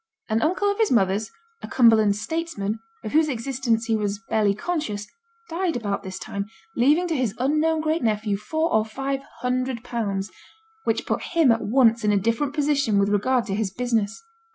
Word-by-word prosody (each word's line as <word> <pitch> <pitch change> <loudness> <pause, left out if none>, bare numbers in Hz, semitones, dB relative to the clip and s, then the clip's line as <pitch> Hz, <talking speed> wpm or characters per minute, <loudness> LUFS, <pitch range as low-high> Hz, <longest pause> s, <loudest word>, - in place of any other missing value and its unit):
An 220 +1 +1
uncle 370 +6 +1
of 405 - -5
his 445 -3 +3
mother's, 200 -2 +2 0.3
a - - -6
Cumberland 220 -4 +5
'statesman', 220 -5 -3 0.2
of 215 - -5
whose 310 0 +3
existence 235 -2 -1
he 225 - +1
was 205 -1 -1
barely 210 -2 +3
conscious, 215 - -3 0.4
died 345 0 -1
about 205 -4 -2
this 190 -1 -7
time, 200 +1 -5 0.3
leaving 300 +9 +3
to 330 - -1
his 245 -6 -1
unknown 310 +5 +1
great 315 +1 0
nephew 215 -2 0
four 315 +11 -1
or 220 - +4
five 270 +5 -3 0.2
hundred 250 -1 -1
pounds, 205 -5 -3 0.5
which - - 0
put - - -1
him 330 -7 +3
at 225 - +1
once 230 0 +3
in 210 - +3
a 205 - +3
different 230 +8 0
position 280 -7 +2
with 200 0 +3
regard 240 +4 +2
to 200 - -3
his 210 0 0
business. 230 - -1
230 Hz, 180 wpm, -24 LUFS, 210-295 Hz, 0.5 s, Cumberland